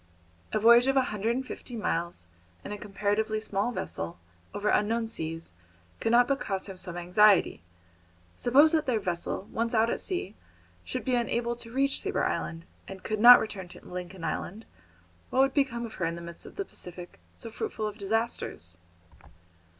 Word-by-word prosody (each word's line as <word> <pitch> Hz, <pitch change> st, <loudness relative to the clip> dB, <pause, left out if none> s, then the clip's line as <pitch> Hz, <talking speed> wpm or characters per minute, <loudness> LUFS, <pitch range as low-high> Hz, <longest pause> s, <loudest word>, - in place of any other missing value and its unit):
A -, -, +1 dB
voyage 235 Hz, +3 st, +6 dB
of 270 Hz, 0 st, +2 dB
a 265 Hz, -, +5 dB
hundred 220 Hz, +3 st, 0 dB
and 260 Hz, +1 st, -3 dB
fifty 245 Hz, -, -7 dB
miles 170 Hz, -, -2 dB, 0.4 s
in -, -, -6 dB
a 210 Hz, -, -4 dB
comparatively 210 Hz, +2 st, -1 dB
small 210 Hz, +1 st, -1 dB
vessel, 85 Hz, -, -4 dB, 0.3 s
over 205 Hz, +1 st, -1 dB
unknown 225 Hz, +2 st, +2 dB
seas, 165 Hz, -, -4 dB, 0.5 s
could 225 Hz, -, 0 dB
not 245 Hz, +1 st, +6 dB
but 275 Hz, -1 st, +1 dB
cause 195 Hz, -6 st, -3 dB
him 195 Hz, -, -7 dB
some 180 Hz, -1 st, -6 dB
anxiety. 180 Hz, -, +4 dB, 0.7 s
Suppose 280 Hz, -, +5 dB
that 315 Hz, -3 st, +1 dB
their 240 Hz, -4 st, +2 dB
vessel, 180 Hz, +1 st, -3 dB
once 230 Hz, +1 st, -1 dB
out 225 Hz, +1 st, +3 dB
at -, -, -2 dB
sea, 355 Hz, -, -3 dB, 0.5 s
should 90 Hz, -, -4 dB
be 255 Hz, -, 0 dB
unable 235 Hz, 0 st, 0 dB
to 230 Hz, -1 st, -9 dB
reach 275 Hz, +2 st, +1 dB
Tabor -, -, -1 dB
Island, 165 Hz, 0 st, -3 dB, 0.2 s
and 190 Hz, -1 st, -9 dB
could 215 Hz, -1 st, -2 dB
not 245 Hz, +3 st, +11 dB
return 195 Hz, -4 st, -5 dB
to -, -, -13 dB
Lincoln 180 Hz, 0 st, -7 dB
Island, 215 Hz, +7 st, -4 dB, 0.6 s
what -, -, -4 dB
would 270 Hz, 0 st, +3 dB
become 250 Hz, -5 st, 0 dB
of 225 Hz, -, -9 dB
her 170 Hz, -, -2 dB
in 165 Hz, 0 st, -2 dB
the 170 Hz, -, -8 dB
midst 170 Hz, 0 st, -8 dB
of -, -, -13 dB
the 395 Hz, -, -3 dB
Pacific, 180 Hz, -, -9 dB, 0.2 s
so 230 Hz, -, -8 dB
fruitful 215 Hz, -, -4 dB
of 210 Hz, 0 st, -5 dB
disasters? 200 Hz, -, -2 dB
215 Hz, 180 wpm, -28 LUFS, 185-240 Hz, 0.7 s, not